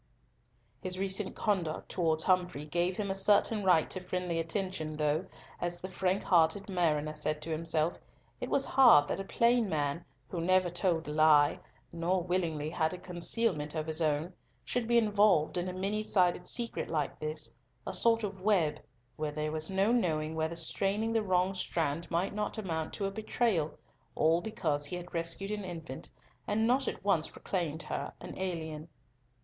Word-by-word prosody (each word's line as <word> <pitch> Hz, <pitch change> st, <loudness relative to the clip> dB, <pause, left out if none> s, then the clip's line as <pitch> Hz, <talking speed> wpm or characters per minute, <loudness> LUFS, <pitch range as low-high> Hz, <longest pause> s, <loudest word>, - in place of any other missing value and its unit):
His 185 Hz, -1 st, -2 dB
recent 190 Hz, +1 st, -1 dB
conduct 180 Hz, -7 st, -1 dB
towards 160 Hz, -3 st, 0 dB
Humfrey 180 Hz, -5 st, +1 dB
gave 175 Hz, +4 st, 0 dB
him 200 Hz, -2 st, -1 dB
a -, -, +1 dB
certain 205 Hz, +2 st, +3 dB
right 180 Hz, -4 st, +4 dB
to 185 Hz, -, -3 dB
friendly 180 Hz, -2 st, -2 dB
attention, 165 Hz, -2 st, -3 dB
though, 150 Hz, 0 st, 0 dB, 0.3 s
as 175 Hz, 0 st, -2 dB
the 185 Hz, +1 st, -7 dB
frank 185 Hz, +1 st, 0 dB
hearted 175 Hz, +3 st, +3 dB
mariner 155 Hz, -5 st, 0 dB
said 150 Hz, 0 st, -2 dB
to 165 Hz, -, -4 dB
himself, 160 Hz, +1 st, -1 dB, 0.4 s
it -, -, -4 dB
was 275 Hz, -, +2 dB
hard 240 Hz, -, +6 dB
that -, -, -1 dB
a -, -, -2 dB
plain 235 Hz, +2 st, +2 dB
man, 150 Hz, +1 st, -1 dB, 0.2 s
who 170 Hz, -, -4 dB
never 185 Hz, 0 st, +3 dB
told 175 Hz, -2 st, 0 dB
a -, -, -3 dB
lie, 150 Hz, -1 st, +5 dB, 0.3 s
nor 175 Hz, +2 st, 0 dB
willingly 170 Hz, -4 st, -1 dB
had 160 Hz, 0 st, 0 dB
a -, -, -8 dB
concealment 175 Hz, -3 st, -1 dB
of 155 Hz, -1 st, -2 dB
his 160 Hz, +1 st, +1 dB
own, 155 Hz, +3 st, 0 dB, 0.3 s
should 245 Hz, -2 st, -1 dB
be 235 Hz, 0 st, +4 dB
involved 205 Hz, -7 st, +3 dB
in 180 Hz, +1 st, -1 dB
a -, -, -3 dB
many 195 Hz, +3 st, -1 dB
sided 180 Hz, -4 st, +2 dB
secret 235 Hz, -1 st, -2 dB
like 150 Hz, -4 st, -2 dB
this, 155 Hz, 0 st, -3 dB, 0.3 s
a -, -, -4 dB
sort 230 Hz, -1 st, +4 dB
of 195 Hz, -2 st, -4 dB
web, 170 Hz, -7 st, +2 dB, 0.4 s
where 155 Hz, -1 st, -2 dB
there 150 Hz, 0 st, -2 dB
was 155 Hz, 0 st, +1 dB
no 195 Hz, +3 st, +2 dB
knowing 160 Hz, -9 st, +1 dB
whether 160 Hz, +1 st, -2 dB
straining 195 Hz, +6 st, 0 dB
the 225 Hz, -1 st, +2 dB
wrong 185 Hz, -1 st, +1 dB
strand 165 Hz, -3 st, -2 dB
might 175 Hz, +4 st, 0 dB
not 210 Hz, +1 st, -3 dB
amount 165 Hz, -7 st, -3 dB
to 200 Hz, -, -3 dB
a 195 Hz, -, -1 dB
betrayal, 215 Hz, -6 st, 0 dB, 0.5 s
all 165 Hz, +2 st, +3 dB
because 155 Hz, -9 st, -2 dB
he 180 Hz, -, -4 dB
had 175 Hz, 0 st, -8 dB
rescued 170 Hz, +4 st, -2 dB
an 210 Hz, -1 st, -3 dB
infant, 165 Hz, -7 st, -7 dB, 0.4 s
and 220 Hz, +2 st, +1 dB
not 255 Hz, +3 st, +2 dB
at -, -, -4 dB
once 170 Hz, -6 st, +3 dB
proclaimed 165 Hz, -4 st, -3 dB
her -, -, -4 dB
an -, -, -8 dB
alien. 160 Hz, -4 st, -4 dB
175 Hz, 175 wpm, -31 LUFS, 155-195 Hz, 0.5 s, hard